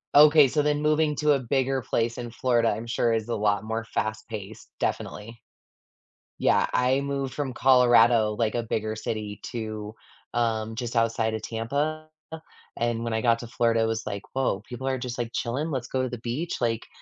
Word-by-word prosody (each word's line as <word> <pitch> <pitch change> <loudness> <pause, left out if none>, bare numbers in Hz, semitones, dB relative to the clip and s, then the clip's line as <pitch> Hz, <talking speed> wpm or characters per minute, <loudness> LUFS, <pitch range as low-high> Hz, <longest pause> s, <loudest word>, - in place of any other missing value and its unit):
Okay, 150 -1 +8
so 150 +3 +1
then 150 0 0
moving 150 0 +2
to 150 0 +3
a 140 - +3
bigger 130 +1 0
place 115 +1 -1
in 120 -1 -5
Florida, 120 -1 +1
I'm 115 - -3
sure, 115 0 +1
is 110 0 -1
a - - 0
lot 105 0 +1
more 110 +1 -3
fast-paced, 110 -2 -5
definitely. 115 +2 -3 1.0
Yeah, - - +3
I 130 +2 +2
moved 140 -1 -3
from 140 -4 -3
Colorado, 120 -4 +5
like, 115 -1 0
a 120 - 0
bigger 110 -1 -2
city 105 -2 -4
to, 110 -2 -5 0.4
um, 115 -2 0
just 120 0 -4
outside 115 -1 +1
of 110 - -3
Tampa, 145 +8 -2 0.7
and 115 -1 -1
when 115 -1 -2
I 110 - 0
got 115 -1 +3
to 120 - -7
Florida, 115 -1 +1
it - - +3
was 110 0 -1
like, 100 -1 -4
"Whoa, 135 0 0
people 130 +2 -6
are 130 -1 0
just, 125 -1 -5
like, 120 -1 -2
chilling, 135 +7 -2
let's 130 -4 -3
go 130 - -1
to 130 - -1
the 120 - -5
beach." 125 +9 -3
Like, 115 -2 -1
120 Hz, 190 wpm, -26 LUFS, 110-130 Hz, 1.0 s, Okay